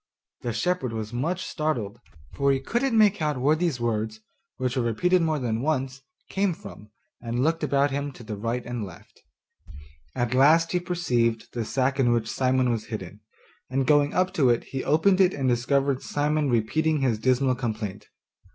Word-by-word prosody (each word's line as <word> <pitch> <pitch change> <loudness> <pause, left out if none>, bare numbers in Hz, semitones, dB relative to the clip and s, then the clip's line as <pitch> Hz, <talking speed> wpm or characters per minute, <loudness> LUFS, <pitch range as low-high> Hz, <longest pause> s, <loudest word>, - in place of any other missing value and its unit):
The 120 - -2
shepherd 125 +1 -1
was 110 0 -5
much 170 +10 -2
startled, 120 - -2 0.3
for 140 0 +2
he 135 - +1
couldn't 235 - 0
make 210 -4 +4
out 150 -3 0
where 145 +5 +3
these 160 -5 -1
words, 110 -2 -2 0.4
which 125 -1 -2
were 130 - +1
repeated 175 - +2
more 160 -2 +1
than 115 -4 -2
once, 135 -2 -1 0.3
came 195 -3 0
from, 105 -7 -12 0.3
and 120 +1 -2
looked 160 +1 0
about 140 -1 +2
him 140 +1 -2
to 125 - -12
the 110 -1 -5
right 115 +4 -3
and 120 -1 -4
left; 95 -4 -12 0.9
at 120 -1 -1
last 155 +6 +5
he 180 - +1
perceived 125 -11 -1
the 120 -2 -2
sack 135 +3 0
in 120 -3 +4
which 115 -2 0
Simon 130 -1 +1
was 115 -2 -2
hidden, 105 -3 -7 0.5
and 135 +1 0
going 145 0 +4
up 185 +1 +1
to 140 -9 +3
it 120 -1 +2
he 135 - -5
opened 185 +6 +3
it 185 -1 +3
and 135 -2 -1
discovered 135 +2 +1
Simon 150 0 0
repeating 150 +7 +1
his 120 -5 +1
dismal 130 +2 +2
complaint. 110 -6 -4
130 Hz, 180 wpm, -25 LUFS, 120-155 Hz, 0.9 s, last